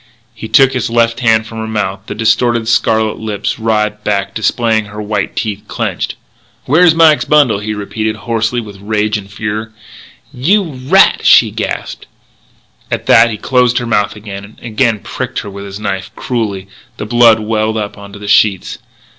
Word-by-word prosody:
He 110 0 -8
took 135 +2 +4
his 125 -2 -2
left 115 0 +1
hand 110 -2 +2
from 115 0 -8
her 110 - -4
mouth. 100 -2 -3
The - - -5
distorted, 115 +1 +1
scarlet 110 -2 +1
lips 110 0 -3
writhed 105 -1 -1
back, 100 -2 -1
displaying 110 0 0
her 105 +1 -10
white 105 -1 -3
teeth 105 -3 -3
clenched. - - -3 0.5
"Where's 160 +4 +4
Mike's 160 -2 +4
bundle!" 145 -9 +3
he 105 +1 -4
repeated, 110 +1 -3
hoarse 115 0 -2
with 105 -5 -5
rage 105 +1 -1
and 100 -2 -5
fear. 110 +2 -4 0.6
"You 190 +12 +2 0.2
rat!" - - +4
she - - +6
gasped. - - -5 0.8
At - - -3
that 115 +1 +6
he 110 - -4
closed 125 +1 +1
her 120 - -1
mouth 105 -3 0
again, 100 -2 -8
and 105 +2 -15
again 115 0 +1
he 105 - -14
pricked - - -5
her 100 - -8
with 100 +1 -8
his 100 0 -8
knife, 100 -3 -3
cruelly. 105 -6 -3 0.3
The - - -5
blood 115 0 +5
welled 110 0 -1
up 105 -1 -4
onto 100 0 -11
the 105 0 -9
sheets. 100 -2 +2
110 Hz, 175 wpm, -14 LUFS, 105-115 Hz, 0.8 s, she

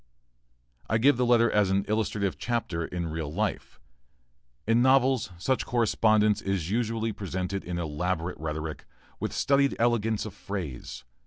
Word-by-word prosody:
I 110 - +3
give 130 +3 +4
the 125 -1 +1
letter 115 -1 +4
as 105 -2 +3
an 100 +1 +1
illustrative 105 -2 -1
chapter 115 -8 -2
in 85 0 -4
real 80 -2 -4
life. 105 +5 -3 0.9
In 115 +2 +3
novels 130 -2 +3
such 130 +9 0
correspondence 110 -3 +2
is 95 -3 -2
usually 115 0 0
presented 95 0 -4
in 90 -1 -4
elaborate 85 +2 -2
rhetoric, 80 0 -4 0.3
with - - -2
studied 140 0 +2
elegance 115 -2 +1
of 110 - -7
phrase. 75 -11 -6
105 Hz, 140 wpm, -27 LUFS, 90-115 Hz, 0.9 s, give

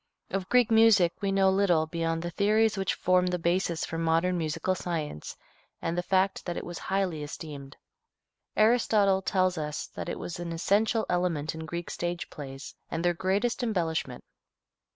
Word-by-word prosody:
Of 190 -1 -3
Greek 245 -2 +4
music 220 -6 +5
we 200 -1 0
know 195 -1 +4
little 185 -5 +3
beyond 165 0 -2
the 175 - -4
theories 215 +3 +2
which 195 -1 -1
form 180 0 +2
the 180 0 0
basis 170 0 0
for 165 - -5
modern 165 +2 +2
musical 165 +2 -1
science 160 - -4 0.4
and 165 - -2
the 175 - 0
fact 190 +2 +1
that 175 - -3
it - - -4
was 175 -1 -6
highly 190 -5 -1
esteemed. 145 -2 -8 0.8
Aristotle 215 -4 +4
tells 185 -2 +1
us 150 -1 -3
that - - -5
it - - -3
was 175 - -6
an 170 -1 -4
essential 215 +6 +1
element 175 -4 0
in 160 0 -7
Greek 170 +1 -5
stage 175 0 -4
plays 135 -1 -8 0.2
and 165 +1 -3
their 175 - +3
greatest 195 +7 0
embellishment. 165 - -2
175 Hz, 170 wpm, -28 LUFS, 165-195 Hz, 0.8 s, music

